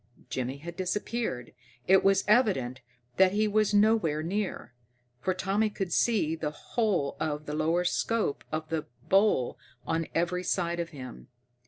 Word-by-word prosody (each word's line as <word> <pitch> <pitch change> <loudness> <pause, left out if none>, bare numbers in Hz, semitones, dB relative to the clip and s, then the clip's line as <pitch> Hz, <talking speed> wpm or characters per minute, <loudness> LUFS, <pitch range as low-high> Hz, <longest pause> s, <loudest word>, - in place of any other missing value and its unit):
Jimmy 130 +1 -2
had 170 +4 -8
disappeared. 185 - -3 0.3
It 190 0 +6
was 195 0 +4
evident 185 - +2 0.4
that 190 0 +5
he 215 +1 +2
was 210 0 +2
nowhere 205 -8 +3
near, 190 -6 -3 0.5
for 185 +8 -1
Tommy 205 +3 +1
could 190 -4 -3
see 180 -10 +2
the 155 -2 -2
whole 180 -2 -1
of 150 -1 -2
the 150 - -5
lower 160 +3 +1
scope 215 -2 0
of 155 0 -3
the 160 -1 -2 0.2
bowl 195 - +3 0.3
on 165 0 -1
every 175 +2 0
side 175 -2 -1
of 170 -1 -2
him. 130 -5 -10
175 Hz, 150 wpm, -29 LUFS, 155-205 Hz, 0.5 s, It